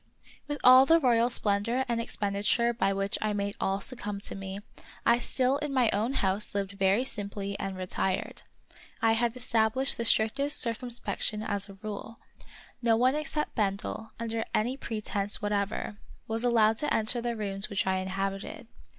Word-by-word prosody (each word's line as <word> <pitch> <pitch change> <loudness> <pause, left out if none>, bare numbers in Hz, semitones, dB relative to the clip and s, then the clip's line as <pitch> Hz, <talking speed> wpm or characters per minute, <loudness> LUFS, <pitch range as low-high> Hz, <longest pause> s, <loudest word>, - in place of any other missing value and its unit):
With 290 0 -3
all 255 +1 +8
the 330 +1 +6
royal 240 -4 +3
splendor 230 +3 +1
and 235 -1 -1
expenditure 210 +2 0
by 195 -4 0
which 195 0 -1
I 215 -1 0
made 200 0 -2
all 195 +1 0
succumb 210 -2 -5
to - - -3
me, 195 0 -6 0.5
I 235 +1 +4
still 260 +2 +1
in 295 -1 -3
my 250 -4 +3
own 220 +6 0
house 200 -2 +1
lived 200 -1 -2
very 200 +4 +1
simply 200 -3 -4
and 195 -1 -4
retired. 185 0 -2 0.6
I 225 - +3
had 235 +2 0
established 245 +2 +2
the 235 - -2
strictest 270 +7 +3
circumspection 230 -2 -1
as 205 -2 -2
a 195 - -11
rule. 215 +2 -7 0.6
No 230 -2 +3
one 255 +3 +3
except 300 0 -2
Bendel, 210 +1 -3
under 230 -1 -2
any 240 +5 0
pretense 210 -5 -1
what 205 0 -3
ever, 205 +1 -3 0.3
was 225 +1 -1
allowed 225 -2 +3
to 295 - -1
enter 225 +2 +2
the 235 0 -2
rooms 200 -2 0
which 200 - -1
I 190 0 +1
inhabited. 195 +4 -4
220 Hz, 170 wpm, -28 LUFS, 200-240 Hz, 0.6 s, all